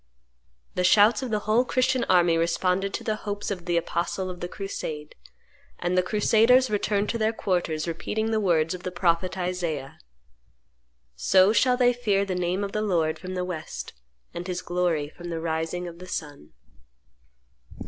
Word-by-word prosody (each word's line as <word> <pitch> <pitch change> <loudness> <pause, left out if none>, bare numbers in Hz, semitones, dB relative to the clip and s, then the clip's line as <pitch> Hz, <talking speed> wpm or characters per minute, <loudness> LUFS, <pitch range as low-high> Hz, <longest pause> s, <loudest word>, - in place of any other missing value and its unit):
The 180 - -1
shouts 210 +4 +5
of 260 - -4
the 215 -2 -1
whole 220 +4 +3
Christian 255 0 +1
army 175 -2 +4
responded 180 +4 +1
to - - -5
the 215 -1 -1
hopes 205 -1 -4
of 180 -3 -5
the 175 -1 +1
apostle 175 +2 -2
of 180 - -9
the 175 - -4
crusade; 160 -6 -6 0.6
and 175 +1 -1
the 185 - +5
crusaders 225 +5 +4
returned 205 0 0
to 230 - -2
their 220 0 +2
quarters 175 -7 -1
repeating 220 +7 -2
the 220 - +2
words 165 -5 +2
of 180 - -7
the 185 - -4
prophet 175 +1 0
Isaiah: 175 -7 -3 1.2
"So 185 - +4
shall 250 +1 +3
they 245 -1 +4
fear 205 -5 +1
the 190 - -3
name 180 +2 -1
of 200 - -3
the 215 - -1
Lord 170 -7 0
from 185 +2 -6
the 180 0 -1
West, 165 -4 -6 0.4
and 175 +1 -6
His 180 -1 -3
glory 175 -4 0
from 175 +3 -10
the 165 -1 -3
rising 165 +2 -2
of 170 0 -10
the 185 - -10
sun." 145 - -6
180 Hz, 175 wpm, -26 LUFS, 170-210 Hz, 1.2 s, shouts